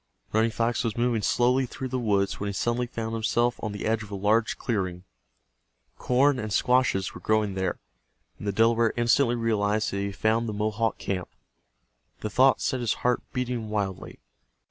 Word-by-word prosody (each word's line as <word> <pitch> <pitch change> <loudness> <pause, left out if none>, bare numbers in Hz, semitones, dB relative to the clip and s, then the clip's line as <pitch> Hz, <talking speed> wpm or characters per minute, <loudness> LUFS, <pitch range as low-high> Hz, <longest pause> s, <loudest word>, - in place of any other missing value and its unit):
Running 110 +1 +3
Fox 115 +2 0
was 115 -2 -2
moving 120 -2 +1
slowly 125 +4 +2
through 130 +2 -6
the 130 0 -2
woods 100 -4 0
when 100 - -3
he 100 - -2
suddenly 120 +4 -1
found 115 -1 -4
himself 120 +2 +1
on 110 - -2
the 100 - -5
edge 110 0 +1
of 105 - -9
a 100 - -5
large 105 +3 +1
clearing. 90 -6 -2 1.0
Corn 130 +2 +3
and 110 -2 -4
squashes 125 -5 +2
were - - -10
growing 110 -2 +1
there, 95 0 -2 0.6
and 105 - -6
the - - +2
Delaware 115 +2 +3
instantly 120 +1 +3
realized 110 -2 0
that 100 - -3
he 100 - -1
had 100 - -6
found 110 +1 +1
the - - -3
Mohawk 110 +1 -1
camp. 90 -3 -3 0.9
The 105 - -4
thought 130 +4 +4
set 130 - 0
his 120 -3 0
heart 125 - +2
beating 125 -3 -3
wildly. 100 -3 -3
110 Hz, 185 wpm, -26 LUFS, 105-120 Hz, 1.0 s, thought